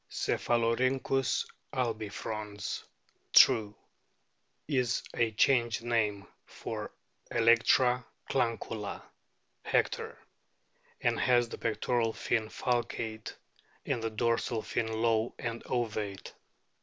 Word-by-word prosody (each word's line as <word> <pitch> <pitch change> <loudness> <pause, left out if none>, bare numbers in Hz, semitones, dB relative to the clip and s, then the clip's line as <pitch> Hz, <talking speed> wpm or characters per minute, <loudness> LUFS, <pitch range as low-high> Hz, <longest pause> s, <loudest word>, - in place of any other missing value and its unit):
Cephalorhynchw 130 +3 +1 0.3
albifrons. 110 -3 -3 0.5
True, 105 -2 +6 0.9
is 125 -5 +1
a 115 -1 +2
changed 120 0 +2
name 105 -4 0 0.2
for - - -6 0.4
Electra 120 +2 +4 0.2
clancula, 115 -4 -2 0.6
Hector,* - - 0 0.8
and - - +1
has 120 -2 +3
the - - -7
pectoral 115 +1 0
fin 110 -2 0
falcate 115 -2 -2 0.5
and 120 - -1
the 115 - -1
dorsal 115 0 0
fin 110 -1 -2
low 110 +1 +1
and 115 -1 -4
ovate. 105 -5 -3
115 Hz, 85 wpm, -31 LUFS, 110-120 Hz, 0.9 s, True